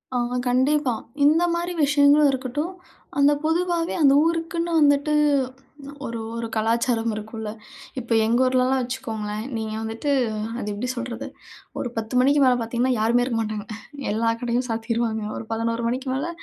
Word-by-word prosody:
ஆ - - +2 0.3
கண்டிப்பா. 260 +1 +2 0.3
இந்த 315 +4 +5
மாதிரி 345 +1 -2
விஷயங்களும் 285 +1 +5
இருக்கட்டும், 270 +6 -3 0.5
அந்த 280 +1 +6
பொதுவாவே 335 +1 0
அந்த 275 -1 +7
ஊருக்குன்னு 335 +1 -1
வந்துட்டு 285 0 +3 0.9
ஒரு 230 0 -4 0.2
ஒரு 230 0 -3
கலாச்சாரம் 225 +1 +1
இருக்கும்ல, 220 0 -6 0.5
இப்ப 235 -1 -9
எங்கள் 235 +3 +3
ஊரிலலாம் 255 +1 +2
வச்சுக்கோங்களேன் 225 -4 -4
நீங்கள் 220 0 -4
வந்துட்டு 225 +6 -4 0.5
அது 210 - -5
எப்படி 245 +5 -3
சொல்றது, 240 0 -5 0.5
ஒரு 245 - -2
10 220 +2 -4
மணிக்கு 280 +3 +4
மேல 255 - +5
பார்த்தீங்கன்னா 240 +3 0
யாருமே 235 +3 +3
இருக்க 235 -3 -2
மாட்டாங்க. 215 -1 -4 0.5
எல்லா 230 +2 +1
கடையும் 245 +1 -1
சாத்திருவாங்க. 225 -1 -1
ஒரு 225 - -6
11 230 +1 -1
மணிக்கு 260 +2 -2
மேலே 285 +6 -2
250 Hz, 140 wpm, -23 LUFS, 225-285 Hz, 0.9 s, அந்த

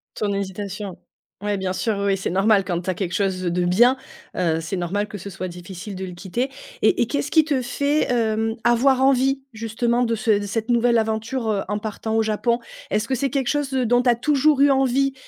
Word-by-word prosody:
Ton 205 -1 -1
hésitation 200 0 -4 0.5
ouais, 205 -1 -1
bien 185 -1 -2
sûr, 215 -1 -1
oui, 200 - -2
oui, 195 - +2
c'est 190 - -3
normal 195 +1 +3
quand 175 -2 -2
tu 180 - -9
as 185 - +1
quelque 180 -1 -3
chose 190 -2 0
de 175 0 0
bien, 240 +9 +4 0.4
heu, 165 -3 0
c'est 180 +4 -3
normal 200 +4 -1
que 205 - -7
ce 200 - -8
soit 185 0 -5
difficile 180 +3 -8
de 190 0 -5
le 180 - -7
quitter. 195 +9 -3 0.3
Et 360 - +3
et - - +2
qu'est-ce 285 +1 -2
qui 315 -1 +5
te 290 -4 0
fait, 280 +5 0
hem, 225 -2 +1
avoir 255 +2 +4
envie 270 0 +3
justement 235 +2 0
de 230 -1 0
ce 220 +1 -1
de 205 - -4
cette 225 +4 -3
nouvelle 235 0 +3
aventure, 225 +2 -1
heu, 205 -2 +1
en 210 0 -1
partant 220 +1 -4
au 225 - +3
Japon? 225 +2 0 0.3
Est-ce 215 +4 0
que 265 - +1
c'est 275 +2 0
quelque 270 -4 -1
chose, 290 -2 -1
heu, 255 -1 +1
dont 245 +2 +3
tu 250 - +1
as 240 - +6
toujours 290 +3 +2
eu 285 - +6
envie 270 0 +2
220 Hz, 230 wpm, -22 LUFS, 195-255 Hz, 0.5 s, as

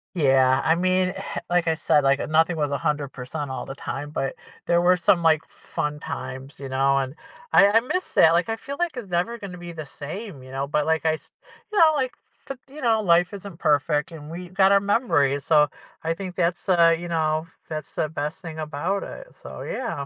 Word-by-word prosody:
Yeah, 135 -3 +4
I 160 - +4
mean, 185 +1 +1 0.4
like 175 -1 +2
I 160 - +3
said, 150 -2 +2
like, 140 +1 +3
uh, - - -2
nothing 160 +2 +2
was 145 -2 0
100% 140 -1 -3
all 130 - -4
the 135 - -7
time, 145 +1 -5
but 135 -3 -3 0.3
there 170 0 +3
were 180 +1 +4
some, 175 0 +3
like, 160 -1 +3
fun 150 0 -4
times, 135 +3 -7
you 135 -1 -6
know, 135 +1 +2
and 135 +2 -2 0.4
I 200 - +8
I 220 +3 +5
miss 365 +9 -3
that, 160 - +6
like, 170 +4 +2
I 225 - 0
feel 280 +5 -7
like 345 -5 -1
it's 215 -6 -6
never 180 +7 -1
gonna 195 -4 -8
be 175 -1 -8
the 155 -2 -7
same, 155 - -8
you 130 0 -12
know, 135 +1 -2
but, 150 0 0
like, 160 0 +1
I 160 - +4
s 155 - -9 0.4
you 420 - -2
know, 315 -2 +7
like, 260 -3 -1 0.3
t 275 - -4 0.2
you 305 - -9
know, 225 -3 +3
life 175 0 +3
isn't 200 -3 -8
perfect, 150 -2 +1
and 155 -1 -9
we 175 +1 -7
got 190 +1 +4
our 200 - +6
memories, 165 - +1
so 150 -2 +5 0.3
I 165 +1 0
think 185 0 -7
that's, 175 +1 -1
uh, 170 -2 +5
you 175 +1 -6
know 160 0 0 0.2
that's 155 -1 -6
the 155 - 0
best 150 +2 -4
thing 160 -2 -7
about 155 +6 -2
it, - - -10
so, - - -10
yeah. 195 - -4
165 Hz, 220 wpm, -24 LUFS, 145-185 Hz, 0.4 s, I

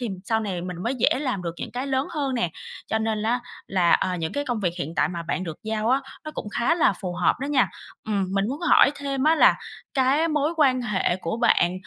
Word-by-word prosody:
thì 240 - -2 0.2
sau 225 +1 +1
này 195 -5 -3
mình 180 0 -5
mới 245 - 0
dễ 250 +1 +2
làm 255 -10 -2
được 170 -1 -4
những - - -6
cái 255 +3 -3
lớn 265 0 0
hơn 275 -4 -2
nè. 180 -8 0 0.4
Cho 220 - 0
nên 220 -1 -1
á, 240 +3 +1 0.3
là, 180 -3 +2
à, 185 -1 +2
những 160 -2 -3
cái 285 - -2
công 245 -5 -2
việc 180 -4 0
hiện 155 +4 -4
tại - - +3
mà 170 -2 -5
bạn 175 +2 -2
được 165 -3 -6
giao 220 0 -1
á, 265 - +3 0.2
nó 310 - -5
cũng 210 - -5
khá 240 +9 +1
là 340 - +3
phù 185 -3 -5
hợp - - +2
đó 280 - -2
nha. 280 -4 +3 0.4
Ừm, 200 -3 0
mình 200 +2 +1
muốn 280 +4 -4
hỏi 345 -5 +6
thêm 280 -1 -2
á 315 +1 +5
là - - +6 0.4
cái 275 +5 +3
mối 300 +1 0
quan 260 -5 +3
hệ 195 -5 0
của 180 +2 -3
bạn 180 -7 +3
230 Hz, 255 wpm, -24 LUFS, 185-275 Hz, 0.4 s, hỏi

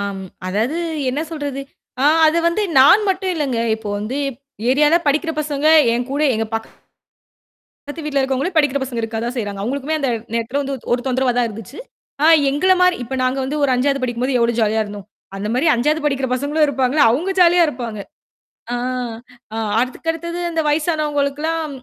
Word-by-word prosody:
ஆம். 200 -1 -4 0.2
அதாவது 220 - -1 0.3
என்ன 285 +4 -2
சொல்றது? 285 -4 -4 0.4
ஆ. - - +3 0.2
அதை 315 +2 +3
வந்து 340 +5 -1 0.2
நான் 385 +11 +7
மட்டும் 380 0 0
இல்லைங்க. 275 -7 -1 0.2
இப்போ 220 -2 -8
வந்து 220 +7 -4 0.5
ஏரியால 295 +4 +4
படிக்கிற 305 +4 +1
பசங்க, 295 -1 -2 0.3
என் 240 +1 -1
கூட 285 +2 -1
எங்க 220 0 -1 1.2
பக்கத்து 295 +2 -10
வீட்டுல 290 -2 -1
இருக்கிறவங்களே, 270 +6 -1
படிக்கிற 285 -2 +2
பசங்க 250 -3 -5
இருக்கதான் 230 +3 -3
செய்றாங்க. 205 -3 -4
அவங்களுக்குமே 280 +6 -2
அந்த 275 - 0 0.2
நேரத்துலலாம் 235 +5 -1
வந்து 275 0 -4 0.2
ஒரு 245 - 0
தொந்தரவா 260 0 +1
தான் 245 -1 +2
இருந்துச்சு. 225 +5 -10 0.4
ஆ - - +5 0.2
எங்கள 300 +7 +2
மாரி 360 0 +4
இப்போ, 255 +3 -5
நாங்க 255 +1 0
வந்து 295 +3 -3
ஒரு 275 - +3
5வது 275 +2 0
படிக்கும்போது 250 +1 -1
எவ்வளோ 235 0 +2
ஜாலியா 220 0 +2
இருந்தோம். 205 -1 -9 0.3
அந்த 200 +2 -4
மாரி 265 +7 +1
5வது 300 +6 +1
படிக்கிற 270 -2 0
பசங்களும் 290 +4 +1
இருப்பாங்கல்ல, 270 +1 +2
அவுங்க 335 +11 -1
ஜாலியா 350 0 +6
இருப்பாங்க. 240 -6 -5 0.8
ஆ. - - 0 0.8
ஆ - - -4 0.2
அதுக்கடுத்தது 325 +7 -3
அந்த 330 -1 -1
வயசானவுங்களுக்குலாம் 300 0 -1
275 Hz, 160 wpm, -19 LUFS, 240-305 Hz, 1.2 s, நான்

